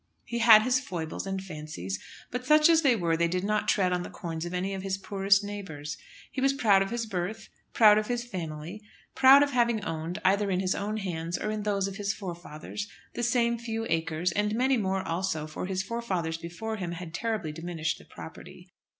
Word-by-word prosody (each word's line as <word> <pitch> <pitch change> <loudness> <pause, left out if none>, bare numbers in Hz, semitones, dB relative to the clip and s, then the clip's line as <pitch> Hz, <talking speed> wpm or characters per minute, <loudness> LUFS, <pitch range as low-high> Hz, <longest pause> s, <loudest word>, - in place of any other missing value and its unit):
He 235 - -3
had 225 -2 +8
his 255 +1 +2
foibles, 175 -6 -5
and 190 0 -3
fancies, 150 - -6 0.3
but 250 +1 -3
such 305 +4 +6
as 325 -1 +5
they 270 -6 +4
were 170 -5 +1
they 170 +1 +2
did 180 +2 -1
not 210 +1 0
tread 185 -3 +2
on 180 - 0
the - - -6
corns 165 -1 -5
of 175 - -5
any 190 +2 -1
of 190 - -4
his 190 0 -2
poorer 195 0 -5
neighbours. 160 -8 -6 0.4
He 265 - -3
was 275 +1 +3
proud 215 -8 +4
of 195 - 0
his 235 0 -2
birth, 215 +2 -4 0.2
proud 215 -2 +7
of 215 - -4
his 240 -1 -1
family, 175 -3 -6 0.3
proud 270 +2 +8
of 285 - -1
having 235 -4 +1
owned, 165 +3 -3
either 200 +2 +3
in 185 -1 +1
his 185 0 +1
own 210 +2 -2
hands 175 -4 -3
or 215 0 -2
those 205 -2 0
of 195 0 -6
his 205 -1 -1
forefathers, 175 +1 -6 0.3
the - - -4
same 235 -1 +2
few 225 -1 -3
acres, 165 +1 0
and 210 +3 0
many 260 +3 +3
more 190 -4 -1
also, 165 -2 -1
for 155 +4 -5
his 190 0 -1
forefathers 185 -9 -2
before 220 +7 -5
him 175 -3 -4
had 170 -1 -7
terribly 215 -5 -2
diminished 165 0 -3
the - - -15
property. - - -11
195 Hz, 210 wpm, -28 LUFS, 170-225 Hz, 0.4 s, had